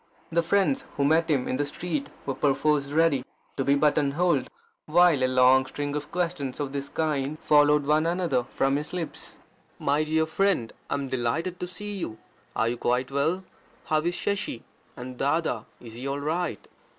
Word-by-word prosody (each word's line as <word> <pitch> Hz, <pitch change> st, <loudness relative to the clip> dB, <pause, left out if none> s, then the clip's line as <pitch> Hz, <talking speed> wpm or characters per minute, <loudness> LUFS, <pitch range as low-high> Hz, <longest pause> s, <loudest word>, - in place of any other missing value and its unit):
The 170 Hz, +1 st, +3 dB
friends 200 Hz, +10 st, +2 dB
who 140 Hz, -, +2 dB
met 160 Hz, +3 st, +3 dB
him 135 Hz, -5 st, +1 dB
in 130 Hz, -, -1 dB
the 145 Hz, -, 0 dB
street 145 Hz, -1 st, -3 dB, 0.2 s
were 135 Hz, -, -1 dB
perforce 145 Hz, +1 st, +2 dB
ready 150 Hz, -2 st, +2 dB, 0.3 s
to 135 Hz, -, -1 dB
be 140 Hz, +1 st, +3 dB
button 145 Hz, -1 st, +2 dB
holed, 170 Hz, -4 st, +1 dB, 0.4 s
while 165 Hz, -3 st, +5 dB
a -, -, +4 dB
long 130 Hz, +1 st, +5 dB
string 145 Hz, +1 st, -4 dB
of 150 Hz, +1 st, -5 dB
questions 170 Hz, -7 st, -2 dB
of 145 Hz, -2 st, -2 dB
this 140 Hz, 0 st, -4 dB
kind 150 Hz, -2 st, -1 dB
followed 150 Hz, -1 st, +4 dB
one 155 Hz, +2 st, +3 dB
another 170 Hz, -7 st, +1 dB
from 135 Hz, +1 st, +1 dB
his 150 Hz, +3 st, -5 dB
lips: 175 Hz, -3 st, -5 dB, 0.4 s
"My 145 Hz, +2 st, +1 dB
dear 160 Hz, +1 st, +1 dB
friend, 170 Hz, -, +1 dB, 0.2 s
I -, -, 0 dB
am 140 Hz, -1 st, -3 dB
delighted 145 Hz, +9 st, -1 dB
to 180 Hz, -, -3 dB
see 205 Hz, +3 st, -6 dB
you. 110 Hz, -10 st, -4 dB, 0.4 s
Are 115 Hz, +2 st, +1 dB
quite 125 Hz, +3 st, 0 dB
well? 160 Hz, +7 st, 0 dB, 0.4 s
How 155 Hz, 0 st, +2 dB
is 175 Hz, +2 st, -1 dB
Shashi? 195 Hz, -, -2 dB, 0.3 s
and 125 Hz, 0 st, -8 dB
Dada 140 Hz, -5 st, 0 dB
is 115 Hz, -2 st, -11 dB
he 125 Hz, +4 st, -6 dB
all 140 Hz, +1 st, -2 dB
right? 160 Hz, +4 st, -2 dB
150 Hz, 180 wpm, -26 LUFS, 135-165 Hz, 0.4 s, while